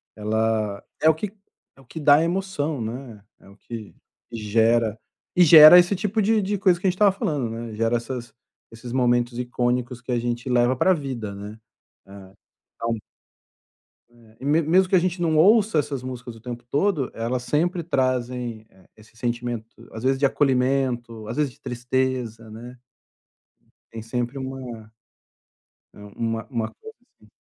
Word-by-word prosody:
ela 110 -1 -1 0.2
é 155 - +6
o - - +5
que 195 +5 -5 0.4
é 135 - -19
o - - -21
que 160 - -8
dá 145 0 +5
emoção, 165 -6 -2
né 115 -2 -7 0.2
é - - -20
o 100 - -17
que, 110 0 -9 0.4
gera 115 0 +1 0.4
e 180 - +6
gera 155 +1 +10
esse 175 +3 +2
tipo 210 +3 -1
de 215 +1 +2
de 205 +1 -1
coisa 185 -3 +3
que 185 - -8
a - - +5
gente 180 - -2
estava 205 +1 +4
falando, 145 - -2
né. 115 0 -6
Gera 115 +2 +1
essas 120 0 -7 0.4
esses 115 +2 -10
momentos 120 -1 +1
icônicos 125 0 -2
que 125 - -6
a 120 - +1
gente 120 +1 -3
leva 125 +1 +3
para 185 +9 +3
vida, 130 - -5
né, 105 +2 -9 1.2
então 115 -1 -3 1.1
é, 115 -2 -22
e - - -8
me 150 +3 +3
mesmo 185 +4 +3
que 190 - +3
a - - +6
gente 175 0 -2
não 160 -2 +1
ouça 205 +2 +5
essas 145 -3 -1
músicas 125 -2 -7
o 115 - -15
tempo 120 0 -7
todo, 150 -2 0
elas 120 +2 -3
sempre 170 +6 0
trazem, 125 -6 -2
eh, 95 -1 -24
esse 110 +1 -20
sentimento, 120 -1 -5
às 110 - -8
vezes 135 +1 +2
de 140 - +2
acolhimento, 125 -5 0
às 120 - -5
vezes 145 -4 0
de - - -27
tristeza, 125 -2 -2
né 120 +3 -11 1.1
tem 115 - -7
sempre 120 +3 -3
uma 130 -5 -7 1.0
Uma 115 +2 -5
uma 115 -3 -2
coisa 445 0 -13 0.3
assim. - - -21
125 Hz, 165 wpm, -23 LUFS, 115-150 Hz, 1.2 s, gera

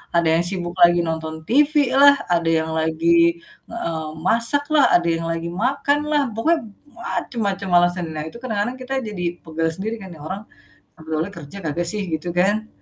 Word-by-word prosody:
Ada 170 -1 +3
yang - - +1
sibuk 180 -2 -4
lagi 175 0 +6
nonton 160 0 -4
TV 290 +5 +4 0.2
lah, 285 +1 +8 0.2
ada 170 -1 +2
yang 160 0 -3
lagi, 170 +1 +2 0.3
eee, 160 -2 -4 0.2
masak 235 +5 +2
lah, 290 -3 +6
ada 175 -1 +2
yang 165 0 0
lagi 165 0 -3 0.2
makan 280 +2 +1
lah, 295 -1 +3
pokoknya 320 +9 +2 0.4
macem-macem 200 - -3
alasan. 175 0 +2
Nah, 155 - -3
itu 160 - -9
kadang-kadang 230 0 -2
kita 255 +1 -5
jadi 210 -5 -5 0.2
pegal 165 0 -2
sendiri 220 +5 -3
kan, 190 - -9
"Nih 160 - -14
orang 190 +6 -5 0.5
sebenernya 160 +2 -4
kerja 165 +4 -9
kagak 170 +3 -1
sih?" 210 - -3
Gitu 160 +2 -3
kan. 205 +5 +1
175 Hz, 175 wpm, -21 LUFS, 165-225 Hz, 0.5 s, lah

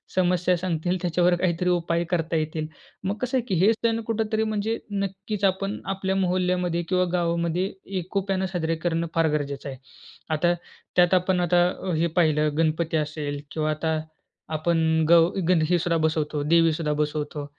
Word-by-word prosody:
समस्या 180 0 +2
सांगतील, 175 0 -1
त्याच्यावर 175 0 +2
काहीतरी 180 0 0
उपाय 170 0 -1
करता 165 -1 0
येतील. 155 0 -2 0.4
मग 195 +2 -1
कसं 255 +1 0
आहे? 245 - -1
की 190 - 0
हे 220 - +6
सण 230 0 0
कुठेतरी 220 0 0
म्हणजे 220 +1 -1 0.3
नक्कीच, 200 +2 -6
आपण 195 +1 -4 0.2
आपल्या 190 0 -1
मोहल्ल्यामध्ये 180 -1 0
किंवा 180 -1 +2
गावामध्ये 170 +1 0 0.3
एकोप्यानं 190 +1 -1
साजरे 165 -1 0
करणं 165 0 0
फार 165 -1 +3
गरजेचं 140 -1 -5
आहे. 130 - -7 0.6
आता 175 +3 +2 0.4
त्यात 180 +1 +4
आपण 185 0 +2
आता 175 +1 +4 0.3
हे 165 +2 +2
पाहिलं, 155 -2 +3
गणपती 160 0 +1
असेल 145 -1 -5
किंवा 155 -1 -1
आता 160 +1 -1 0.6
आपण 165 +2 +1 0.3
गव 170 -1 +7 0.2
गंध 175 -4 +4
हे 175 - +4
सुद्धा 170 0 +1
बसवतो, 155 -2 0
देवी 165 -1 +5
सुद्धा 155 -1 -2
बसवतो. 150 -1 -2
170 Hz, 155 wpm, -25 LUFS, 160-185 Hz, 0.6 s, गव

